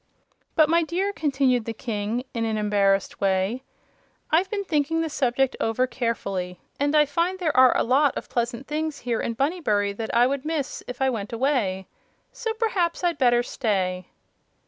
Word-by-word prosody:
"But, 310 -1 +5
my 335 +2 +3
dear," 365 +5 -1
continued 270 - +1
the 230 - -4
King, 220 +1 -3
in 230 - -2
an 220 -1 -1
embarrassed 200 -2 +1
way, 195 +5 +1 0.7
"I've 350 +5 +3
been 405 -1 -2
thinking 325 -2 0
the 325 - -2
subject 265 -1 +1
over 225 +3 +1
carefully, 195 -8 -3 0.2
and 285 +2 +1
I 300 0 +6
find 335 +6 -1
there 335 -5 -1
are 255 0 +6
a - - +2
lot 270 +4 +3
of - - -6
pleasant 240 +2 -2
things 305 0 -3
here 235 -2 -1
in 230 - -3
Bunnybury 225 - 0
that 220 +2 -5
I 240 +1 +4
would 270 +1 -1
miss 305 -3 -3
if 250 +2 -3
I 265 - +3
went 210 -4 -4
away. 230 -7 0 0.5
So 455 -2 -3
perhaps 385 -7 0
I'd 345 -4 0
better 240 -2 +4
stay." 185 -8 -1
255 Hz, 175 wpm, -24 LUFS, 220-310 Hz, 0.7 s, I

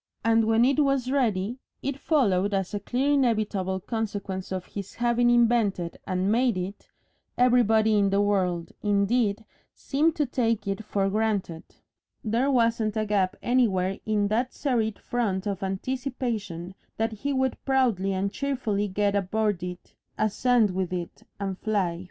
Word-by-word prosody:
And 225 0 +4
when 225 +2 +4
it 275 +2 +2
was 275 -3 +1
ready, 235 -3 0 0.2
it 275 0 -3
followed 205 - +2
as 195 0 -2
a 205 - -1
clear 255 +7 0
inevitable 215 -8 +1
consequence 200 -3 -4
of 185 -1 -3
his 200 -2 -8
having 240 0 +2
invented 230 -7 +2
and 185 +1 0
made 240 -2 +2
it 185 +3 -6 0.5
everybody 225 -3 +4
in 200 -1 +3
the 195 +1 +2
world, 185 -5 0
indeed, 205 +1 +1 0.3
seemed 305 +3 +1
to 300 - +1
take 230 -5 -1
it 195 +2 -2
for 200 -2 0
granted; 200 -5 -1 0.6
there 235 +5 +1
wasn't 230 -4 +1
a 215 - 0
gap 200 -3 +1
anywhere 195 -7 +1
in 210 -2 +1
that 240 +4 -1
serried 225 -6 0
front 205 -6 -2
of 200 -1 -3
anticipation 205 -4 -3 0.2
that 225 +1 0
he 275 +7 -3
would 265 -1 -1
proudly 240 -8 +1
and 195 +1 -1
cheerfully 240 -8 -1
get 205 +1 0
aboard 205 -1 0
it, 180 0 -7 0.2
ascend 220 0 +2
with 185 -1 -2
it, 175 -2 -5 0.2
and 195 -2 -3
fly. 190 -6 -1
215 Hz, 150 wpm, -26 LUFS, 195-245 Hz, 0.6 s, And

